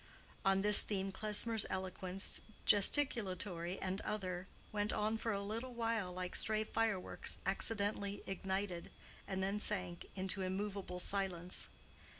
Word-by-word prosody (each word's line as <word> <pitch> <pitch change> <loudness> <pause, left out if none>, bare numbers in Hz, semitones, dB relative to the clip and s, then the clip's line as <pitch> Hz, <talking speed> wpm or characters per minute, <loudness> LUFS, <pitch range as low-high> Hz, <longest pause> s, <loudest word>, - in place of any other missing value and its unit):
On 195 -1 +3
this 210 0 +9
theme 195 -2 -2
Klesmer's 215 +2 +1
eloquence, 190 0 -2 0.2
gesticulatory 195 - +4
and 190 +1 -2
other, 185 -3 -3 0.2
went 210 0 0
on 215 +1 0
for 225 - -1
a 200 -1 -2
little 230 +5 -5
while 225 -5 -1
like 180 0 -4
stray 215 0 +2
fireworks 220 -3 -1
accidentally 200 0 -1
ignited, 190 -1 -3 0.4
and 190 -1 -2
then 200 +2 -1
sank 185 -5 -3
into 190 0 +1
immovable 190 -1 -3
silence. 180 -2 0
195 Hz, 125 wpm, -37 LUFS, 185-210 Hz, 0.4 s, this